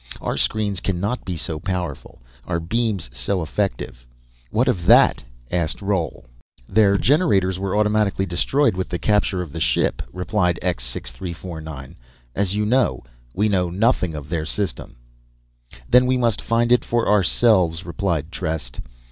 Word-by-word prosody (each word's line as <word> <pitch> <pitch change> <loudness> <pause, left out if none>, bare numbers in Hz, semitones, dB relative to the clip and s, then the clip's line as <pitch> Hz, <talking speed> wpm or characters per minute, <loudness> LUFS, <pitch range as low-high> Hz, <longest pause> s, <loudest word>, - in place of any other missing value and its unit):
Our - - -3
screens 105 -3 0
cannot 100 +6 -2
be 90 -3 -4
so 80 0 -2
powerful, 90 -10 -5 0.2
our 85 -2 -1
beams 105 - -1
so 95 +6 -1
effective. 80 -9 -3 0.5
What 120 - +1
of 90 -9 0
that?" - - +6 0.3
asked 85 -3 +1
Roal. 95 -10 -2 0.4
"Their 100 -1 +4
generators 100 - +2
were 95 +1 -1
automatically 105 -2 +1
destroyed 95 +8 +1
with 95 0 -3
the 90 - -2
capture 100 -2 +1
of 80 - -10
the - - -6
ship," - - +1
replied 90 -1 0
X 90 -10 0
6349, 80 +2 -6 0.4
"as 100 0 0
you 105 0 0
know. 125 +2 +1 0.3
We 105 +3 +2
know 90 -4 +1
nothing 90 -3 +1
of 75 -1 -7
their 80 -2 -2
system." 95 -10 -3 0.9
"Then 125 +1 +5
we 130 0 +2
must 115 -3 +1
find 115 +1 +1
it 125 - +4
for 120 -1 0
ourselves," 95 -4 +3
replied 85 -3 -2
Trest. 80 -9 -4
95 Hz, 150 wpm, -22 LUFS, 85-105 Hz, 0.9 s, that